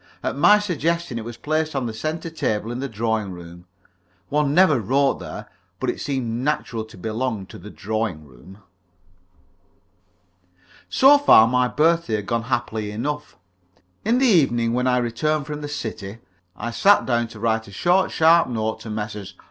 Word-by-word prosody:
At - - -2
my 205 +9 +6
suggestion 170 - -2
it - - -6
was 120 0 -8
placed 155 +3 -2
on 135 -2 -1
the 115 - -4
centre 155 +8 -4
table 110 -7 -2
in 120 - -4
the 140 +1 -4
drawing 110 -2 -2
room. 85 0 -12 0.6
One 150 -1 +1
never 155 -4 +4
wrote 135 +6 +1
there, - - -8 0.3
but - - 0
it - - -9
seemed 125 -4 -3
naturally 120 -6 -2
to 110 - -15
belong 110 +1 -3
to - - -12
the 105 - -10
drawing 105 -7 -3
room. 70 +8 -16 2.3
So 285 +2 +6
far, 115 - +7
my 125 +1 +2
birthday 160 -1 +1
had 105 -2 -4
gone 115 +1 -2
happily 110 -4 -2
enough. 145 +8 -4 0.7
In 230 +4 +2
the 265 - +3
evening, 120 - +3
when 125 +1 0
I 125 0 +3
returned 135 +5 -1
from 150 0 -6
the 145 - -5
city, 110 -6 -6 0.4
I 115 +4 -4
sat 200 - +4
down 120 -2 0
to 110 -1 -12
write 110 0 0
a - - -12
short, 180 - +2
sharp 165 +1 +4
note 110 -2 -2
to 115 - -9
Messrs. 105 -2 -6
120 Hz, 170 wpm, -22 LUFS, 110-150 Hz, 2.3 s, far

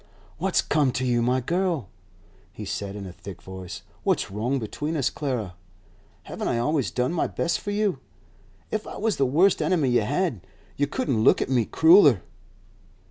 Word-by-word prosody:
'What's - - +1
come 145 -4 +2
to 130 - -1
you, 120 -1 +2
my 125 +2 +1
girl?' 170 - -1 0.6
he 105 - -8
said 100 0 -4
in 100 -1 -6
a 90 - -8
thick 95 0 -10
voice. 95 0 -9 0.2
'What's 185 - 0
wrong 115 +7 -1
between 150 +7 -3
us, 135 -3 +1
Clara? 125 -10 -3 0.7
Haven't - - -5
I 120 - 0
always 140 +2 0
done 125 +5 -1
my 175 - 0
best 170 0 -1
for - - -6
you? 205 -1 0 0.7
If 215 0 -2
I - - -7
was 220 0 0
the 135 - +2
worst 175 +9 +3
enemy 160 -8 +2
you 120 -1 +3
had, 140 - -1 0.3
you 145 - 0
couldn't 140 - -1
look - - +5
at - - -2
me 120 -4 +3
crueller. 160 - +6
130 Hz, 180 wpm, -25 LUFS, 110-170 Hz, 0.7 s, crueller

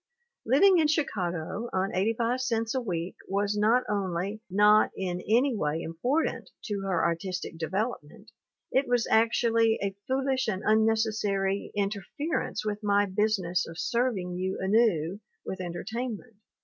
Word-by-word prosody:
Liv 270 - +4
ing 385 -3 +7
in 310 - +4
Chicago 200 - -2
on 190 +1 0
85 230 +6 0
cents 230 -3 -1
a 260 - 0
week 175 -5 -4
was 200 +1 0
not 220 +4 +3
only 200 +1 -2
not 210 +3 +5
in 180 -1 -3
any 245 +3 +3
way 150 -5 -1
important 245 - -1
to 205 -3 -3
her 195 -2 0
artistic 180 +1 -2
development, 200 +2 -4 0.4
it 270 +1 +2
was 245 -2 +2
actually 225 0 +3
"a 195 -1 -2
foolish 265 0 0
and 195 -2 -2
unnecessary 215 -3 +1
interference 210 - -2
with 210 0 -2
my 205 -1 +3
business 190 -3 0
of 165 - -9
serving 235 -7 -1
you 185 +1 -2
anew 195 -4 +2 0.3
with 190 - -5
entertain 220 +7 -4
ment." 225 0 -19
210 Hz, 140 wpm, -28 LUFS, 190-230 Hz, 0.4 s, ing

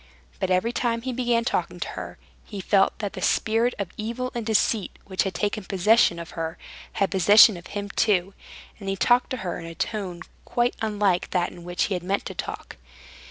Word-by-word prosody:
But - - -1
every 185 +6 +2
time 230 -2 -1
he 260 0 -3
began 240 -1 +1
talking - - -1
to - - -3
her, - - -7 0.3
he 205 - -8
felt 195 +1 +2
that 205 -1 -4
the 190 - -7
spirit 225 +6 +1
of 200 -4 -4
evil 235 +4 -3
and 235 - -3
deceit, 220 -1 +1
which 190 -1 -1
had 195 - -2
taken 205 0 -1
possession 195 -1 +3
of 170 -1 -8
her, 165 -1 -4 0.4
had 195 - 0
possession 205 +2 +7
of 175 0 -10
him 205 0 -4
too, 195 -4 +1 0.5
and 195 -2 -5
he 195 - 0
talked 245 +5 +3
to 260 - -3
her 175 - -3
in 165 - -8
a 165 - -8
tone 185 -4 -3 0.2
quite 240 0 0
unlike 205 -4 +1
that 180 -2 0
in 175 - -12
which 175 0 -1
he 205 - -1
had 180 - -2
meant 195 +3 -1
to - - -5
talk. - - -6
205 Hz, 205 wpm, -25 LUFS, 185-230 Hz, 0.5 s, possession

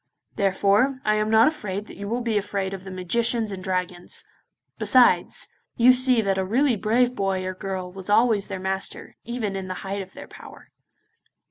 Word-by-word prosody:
Therefore, 200 +7 +2
I 215 - +3
am 215 0 0
not 220 +4 +6
afraid 210 -10 -3
that - - -12
you 200 - -7
will 240 +2 -1
be 230 -2 -1
afraid 195 -1 -2
of 190 -1 -7
the 190 - -9
magicians 220 +5 0
and 185 -1 -6
dragons; 180 -1 -3 0.5
besides, - - +3 0.3
you 245 +2 +6
see 255 -2 +3
that 195 -1 0
a - - +1
really 245 +6 +2
brave 240 +4 +1
boy 195 -4 -1
or 185 - -3
girl 185 -1 -5
was 190 +1 -10
always 215 -1 +3
their 195 -2 -5
master, 190 +1 -4
even 230 -4 -3
in 190 -1 -5
the 185 - -4
height 195 +1 -3
of 190 0 -11
their - - -10
power. - - -14
200 Hz, 190 wpm, -24 LUFS, 190-230 Hz, 0.5 s, not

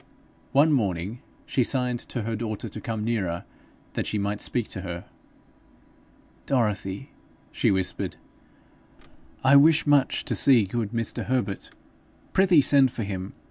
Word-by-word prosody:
One 145 +3 +4
morning 100 - -1 0.3
she 130 - +1
signed 125 -1 0
to 120 -1 -4
her 115 +1 -2
daughter 110 -1 -4
to - - -8
come 110 -2 -3
nearer 100 -7 -2 0.5
that - - -2
she 105 - -1
might 100 0 -2
speak 120 -3 0
to 95 - -4
her. 90 -1 -6 1.4
'Dorothy,' 105 -2 -1 0.4
she - - +1
whispered, 95 -2 -1 1.3
'I 135 +1 +7
wish 155 +2 +5
much 145 -2 +2
to - - -2
see 125 -7 +6
good 110 +2 -3
Mr. 115 -1 -2
Herbert. 120 -6 -2 0.6
Prithee 185 -5 +5
send 135 -1 +4
for 115 - -4
him. 95 -2 -5
115 Hz, 140 wpm, -25 LUFS, 100-135 Hz, 1.4 s, I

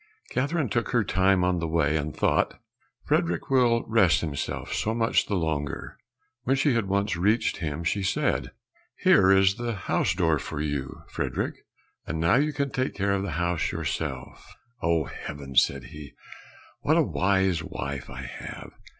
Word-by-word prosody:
Catherine 145 +3 0
took 120 +3 -1
her 120 -3 +3
time 95 -1 +2
on 90 -1 +1
the 85 - -2
way, 80 -2 +1
and 75 0 -1
thought, - - +1 0.5
"Frederick 85 +7 0
will 120 -3 +4
rest 110 -7 +4
himself 75 -4 -4
so 110 +1 -1
much 115 0 +2
the 100 - -1
longer." 80 -5 -2 0.5
When 130 +2 +1
she 140 0 +2
had 115 -4 0
once 100 0 0
reached 105 +7 +1
him 80 -1 -3
she 100 +5 0
said, 95 - 0 0.5
"Here 95 -1 +5
is 95 +1 +5
the 120 -2 -2
house 95 - 0
door 80 -5 +2
for 75 - -5
you, 70 -3 -3
Frederick, - - -2 0.5
and 80 - -3
now 85 +3 +3
you 150 +2 +2
can 140 -2 -2
take 130 0 -1
care 100 0 0
of 100 - 0
the 95 -5 -3
house 85 -2 0
yourself." - - -5 0.3
"Oh, 85 -2 +2
heavens," 70 -1 0
said 70 -2 -3
he, 75 -3 -10 0.7
"what - - +3
a - - +5
wise 95 -3 +1
wife 70 -4 -5
I 65 +2 -7
have! 60 - -8
90 Hz, 165 wpm, -26 LUFS, 80-110 Hz, 0.7 s, Here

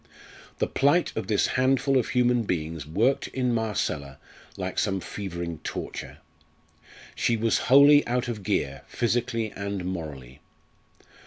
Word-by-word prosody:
The - - +1
plight 145 +6 +2
of 110 -4 -3
this 105 -1 +2
handful 135 +1 +2
of 120 - -2
human 125 -1 +2
beings 80 - -3
worked 115 - +1
in 125 -2 -1
Marcella 100 -11 -2 0.4
like - - -3
some 95 -1 0
fevering 85 -4 -5
torture. - - -6 1.0
She 115 - +1
was 115 +1 +1
wholly 145 +2 +7
out 125 +1 0
of 115 -4 -4
gear 70 -7 -1
physically 115 -2 -1
and 100 -2 -4
morally. 75 -8 -6
110 Hz, 130 wpm, -26 LUFS, 85-125 Hz, 1.0 s, wholly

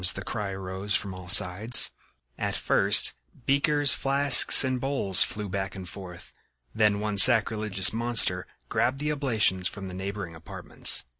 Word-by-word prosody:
the 95 - -9
cry 105 +1 -7
arose 95 +1 -5
from 100 -2 -3
all 90 -1 -13
sides. 100 +7 +3 0.4
At - - -6
first - - +1 0.3
beakers, 145 +1 +1
flasks 140 -1 +6
and 130 -1 -5
bowls 135 -9 -1
flew 105 -1 -2
back 95 0 -7
and 95 -1 -11
forth. 90 -2 -14 0.4
Then 105 -2 -1
one 105 -1 -1
sacrilegious 105 -4 +3
monster 115 -6 0 0.2
grabbed 120 +4 -3
the 150 +2 -5
oblations 110 -10 -2
from 95 -2 -9
the - - -12
neighboring 95 -1 -9
apartments. 80 -5 -3
105 Hz, 145 wpm, -23 LUFS, 95-120 Hz, 0.4 s, flasks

